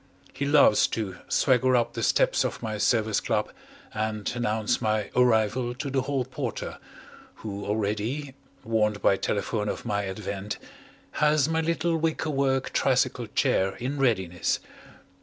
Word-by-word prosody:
He 140 Hz, -, -3 dB
loves 140 Hz, -7 st, +5 dB
to 100 Hz, -5 st, -4 dB
swagger 130 Hz, -1 st, +3 dB
up 120 Hz, -1 st, +1 dB
the -, -, -4 dB
steps -, -, +3 dB
of -, -, -4 dB
my 110 Hz, -2 st, -3 dB
Service 110 Hz, -1 st, +2 dB
Club -, -, -1 dB, 0.4 s
and 110 Hz, -1 st, -2 dB
announce 115 Hz, -1 st, 0 dB
my 110 Hz, -2 st, 0 dB
arrival 120 Hz, 0 st, +2 dB
to 140 Hz, +1 st, -4 dB
the 135 Hz, 0 st, +1 dB
Hall 135 Hz, -1 st, -1 dB
Porter, 130 Hz, -3 st, -5 dB, 0.6 s
who 100 Hz, -2 st, -6 dB
already, 110 Hz, +7 st, -2 dB, 0.3 s
warned 105 Hz, -2 st, 0 dB
by 100 Hz, -, +5 dB
telephone 105 Hz, +1 st, -1 dB
of -, -, -5 dB
my 100 Hz, -2 st, -1 dB
advent, 100 Hz, +1 st, -5 dB, 0.5 s
has 150 Hz, -1 st, +3 dB
my 160 Hz, 0 st, +1 dB
little 165 Hz, +1 st, 0 dB
wicker 160 Hz, -1 st, -1 dB
work 135 Hz, -1 st, 0 dB
tricycle -, -, +1 dB
chair 95 Hz, +1 st, +1 dB
in 135 Hz, +4 st, -4 dB
readiness. 95 Hz, -9 st, +1 dB
115 Hz, 140 wpm, -26 LUFS, 105-135 Hz, 0.6 s, loves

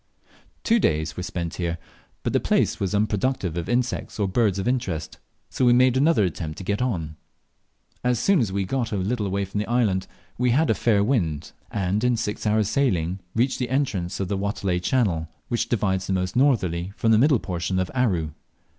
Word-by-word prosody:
Two 230 Hz, +1 st, +3 dB
days 80 Hz, -, 0 dB
were -, -, -4 dB
spent 85 Hz, -2 st, -4 dB
here, 85 Hz, -1 st, -2 dB, 0.5 s
but -, -, -1 dB
the -, -, +4 dB
place -, -, +1 dB
was 100 Hz, +1 st, -1 dB
unproductive 105 Hz, -3 st, 0 dB
of 85 Hz, -1 st, -4 dB
insects 125 Hz, +1 st, -1 dB
or 100 Hz, -2 st, +1 dB
birds 100 Hz, 0 st, +1 dB
of 95 Hz, -, -2 dB
interest, 95 Hz, -, -2 dB, 0.3 s
so -, -, -1 dB
we 120 Hz, -1 st, +6 dB
made 125 Hz, 0 st, +4 dB
another 145 Hz, -3 st, +4 dB
attempt 80 Hz, -3 st, -4 dB
to -, -, -7 dB
get 100 Hz, +4 st, -1 dB
on. 85 Hz, -11 st, -2 dB, 0.9 s
As 125 Hz, -1 st, +2 dB
soon 195 Hz, -, +3 dB
as 110 Hz, -7 st, 0 dB
we 100 Hz, 0 st, -1 dB
got 120 Hz, +2 st, -2 dB
a -, -, -1 dB
little 105 Hz, +3 st, -1 dB
away 100 Hz, +1 st, -1 dB
from 100 Hz, +2 st, -4 dB
the 105 Hz, -, -2 dB
land 105 Hz, -6 st, +1 dB, 0.3 s
we 125 Hz, 0 st, +2 dB
had 150 Hz, +7 st, +3 dB
a -, -, +4 dB
fair 105 Hz, -4 st, +2 dB
wind, 90 Hz, -, -1 dB, 0.2 s
and 100 Hz, +2 st, -1 dB
in 125 Hz, -1 st, +2 dB
six 110 Hz, -1 st, -3 dB
hours' 105 Hz, -1 st, +2 dB
sailing 95 Hz, -8 st, 0 dB, 0.2 s
reached 125 Hz, +4 st, +1 dB
the 125 Hz, -2 st, -2 dB
entrance 125 Hz, -10 st, -1 dB
of 95 Hz, -, -1 dB
the 100 Hz, +1 st, -2 dB
Watelai 100 Hz, -3 st, -1 dB
channel, 90 Hz, -7 st, +1 dB, 0.2 s
which 120 Hz, -2 st, -1 dB
divides 95 Hz, -5 st, 0 dB
the 95 Hz, -, 0 dB
most 90 Hz, -1 st, -1 dB
northerly 100 Hz, -, +1 dB
from 115 Hz, -, +2 dB
the 110 Hz, -, +5 dB
middle 140 Hz, +1 st, +5 dB
portion 90 Hz, -2 st, -3 dB
of 95 Hz, -1 st, -1 dB
Aru. 95 Hz, -12 st, 0 dB
100 Hz, 200 wpm, -24 LUFS, 90-125 Hz, 0.9 s, we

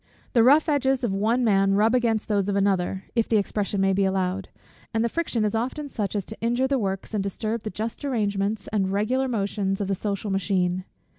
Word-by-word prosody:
The 235 Hz, -, +5 dB
rough 285 Hz, +7 st, +5 dB
edges 270 Hz, -3 st, +1 dB
of 220 Hz, -5 st, 0 dB
one 225 Hz, +5 st, +1 dB
man 195 Hz, -3 st, +3 dB
rub 215 Hz, +3 st, +3 dB
against 230 Hz, -4 st, +1 dB
those 205 Hz, -2 st, +1 dB
of 200 Hz, -, 0 dB
another, 195 Hz, -1 st, +1 dB
if 230 Hz, -2 st, +1 dB
the 225 Hz, -, +4 dB
expression 205 Hz, 0 st, -1 dB
may 195 Hz, 0 st, +3 dB
be 195 Hz, +1 st, +2 dB
allowed; 190 Hz, 0 st, -1 dB, 0.5 s
and 225 Hz, +1 st, +2 dB
the -, -, +1 dB
friction 245 Hz, -7 st, -1 dB
is 210 Hz, -, 0 dB
often 260 Hz, +6 st, -2 dB
such 210 Hz, -5 st, -3 dB
as 200 Hz, -3 st, -1 dB
to 220 Hz, -, -9 dB
injure 240 Hz, +3 st, +1 dB
the 275 Hz, -1 st, +1 dB
works, 195 Hz, 0 st, -3 dB
and 205 Hz, -2 st, 0 dB
disturb 215 Hz, +3 st, -3 dB
the 215 Hz, -, -4 dB
just 220 Hz, +7 st, -5 dB
arrangements 210 Hz, -5 st, -1 dB
and 195 Hz, -3 st, 0 dB
regular 225 Hz, +7 st, 0 dB
motions 200 Hz, -4 st, -1 dB
of 200 Hz, -, -2 dB
the 195 Hz, -, 0 dB
social 200 Hz, +1 st, -3 dB
machine. 185 Hz, -1 st, 0 dB
210 Hz, 215 wpm, -25 LUFS, 195-235 Hz, 0.5 s, The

